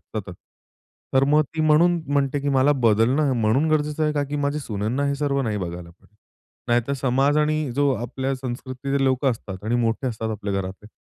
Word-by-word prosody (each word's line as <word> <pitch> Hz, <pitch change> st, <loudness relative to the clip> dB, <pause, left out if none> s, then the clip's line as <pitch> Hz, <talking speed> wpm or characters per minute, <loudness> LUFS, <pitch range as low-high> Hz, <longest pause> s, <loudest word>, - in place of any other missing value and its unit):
सतत. -, -, -7 dB, 0.8 s
तर 135 Hz, +1 st, +5 dB
मग 150 Hz, +2 st, +4 dB
ती 160 Hz, -, -2 dB
म्हणून 165 Hz, +3 st, +4 dB
म्हणते, 140 Hz, 0 st, +1 dB
की 145 Hz, -, -2 dB
मला 135 Hz, +1 st, +4 dB
बदलणं 120 Hz, +6 st, +3 dB
म्हणून 130 Hz, +9 st, +2 dB
गरजेचं 150 Hz, 0 st, 0 dB
आहे, 150 Hz, -, +1 dB
का 145 Hz, -, 0 dB
की 145 Hz, +1 st, -4 dB
माझ्या 145 Hz, +1 st, -1 dB
सुनांना 115 Hz, +3 st, -2 dB
हे 140 Hz, -, 0 dB
सर्व 140 Hz, -1 st, 0 dB
नाही 110 Hz, -3 st, -2 dB
बघायला 85 Hz, -1 st, -6 dB
पडेल. 100 Hz, +4 st, -26 dB, 0.5 s
नाहीतर 120 Hz, +3 st, +1 dB
समाज 135 Hz, +3 st, +2 dB
आणि 150 Hz, 0 st, +2 dB, 0.2 s
जो 145 Hz, -1 st, +3 dB
आपल्या 130 Hz, +3 st, -3 dB
संस्कृतीचे 130 Hz, +2 st, -3 dB
लोकं 130 Hz, +1 st, +2 dB
असतात 100 Hz, -4 st, -7 dB
आणि 115 Hz, +2 st, 0 dB
मोठे 115 Hz, +2 st, 0 dB
असतात 110 Hz, -2 st, -3 dB
आपल्या 100 Hz, -1 st, -4 dB
घरातले, 95 Hz, +2 st, -5 dB
135 Hz, 185 wpm, -23 LUFS, 115-145 Hz, 0.8 s, तर